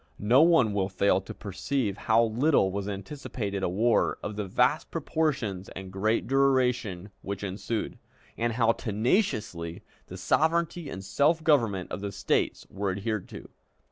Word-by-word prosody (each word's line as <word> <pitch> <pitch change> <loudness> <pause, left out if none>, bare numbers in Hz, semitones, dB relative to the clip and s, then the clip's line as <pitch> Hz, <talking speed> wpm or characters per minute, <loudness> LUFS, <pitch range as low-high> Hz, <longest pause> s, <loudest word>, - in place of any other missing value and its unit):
No 120 +7 +4
one 160 -10 +4
will 95 -1 0
fail 95 0 +2
to 95 - -10
perceive 105 +2 -2
how 110 +3 +3
little 115 -2 +2
was 100 +1 -3
anticipated 100 -1 -5
a 95 - 0
war 110 +6 +2
of 105 - -4
the 105 -1 -3
vast - - +1
proportions 115 - -2
and 95 0 -8
great 110 +4 +1
duration 125 -8 +1
which 100 0 -5
ensued, 100 +3 -4 0.4
and 120 0 -1
how 115 -1 +3
tenaciously 105 - -1 0.2
the 90 - -8
sovereignty 160 - +1
and 95 - -7
self 145 - +2
government 115 - +2
of - - -4
the 100 -1 -4
States 95 - -1
were 100 0 -3
adhered 100 +2 -3
to. - - -10
105 Hz, 150 wpm, -28 LUFS, 95-130 Hz, 0.4 s, No